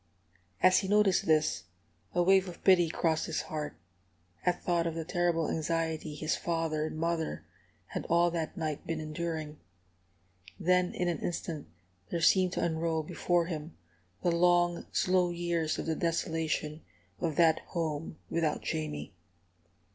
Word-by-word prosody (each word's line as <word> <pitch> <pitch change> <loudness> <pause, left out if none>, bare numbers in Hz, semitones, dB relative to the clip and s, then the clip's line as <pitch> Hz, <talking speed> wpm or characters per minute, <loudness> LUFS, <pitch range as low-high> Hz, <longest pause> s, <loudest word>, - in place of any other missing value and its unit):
As 185 0 +7
he 190 - -3
noticed 205 -3 +3
this, 155 - +2 0.5
a 175 - +4
wave 190 +1 +4
of 175 - -12
pity 175 -3 +5
crossed 160 -1 0
his 160 - -1
heart, 150 - -4 0.7
at 180 0 0
thought 170 -1 +1
of 165 - -3
the 165 -1 -3
terrible 175 -2 +1
anxiety 160 -1 -1
his 155 +1 -1
father 160 -2 -1
and 155 - -6
mother 165 0 -2 0.4
had - - -4
all 170 +1 +4
that 165 -2 -3
night 155 -3 -3
been 165 -1 -2
enduring. 155 -1 -4 1.0
Then 180 0 +2
in 180 - 0
an 170 -3 -1
instant 165 -3 -4 0.4
there 170 - -1
seemed 180 +2 +4
to - - -1
unroll 160 -1 0
before 175 +1 +1
him 160 -1 -6 0.5
the 175 - +3
long, 175 0 +3
slow 180 -1 +2
years 170 -2 -1
of - - -3
the 160 - 0
desolation 160 -2 -1 0.4
of 160 -3 -1
that 160 -1 +5
home 160 -2 -3
without 160 -2 0
Jamie. 75 -1 -3
165 Hz, 145 wpm, -31 LUFS, 155-175 Hz, 1.0 s, As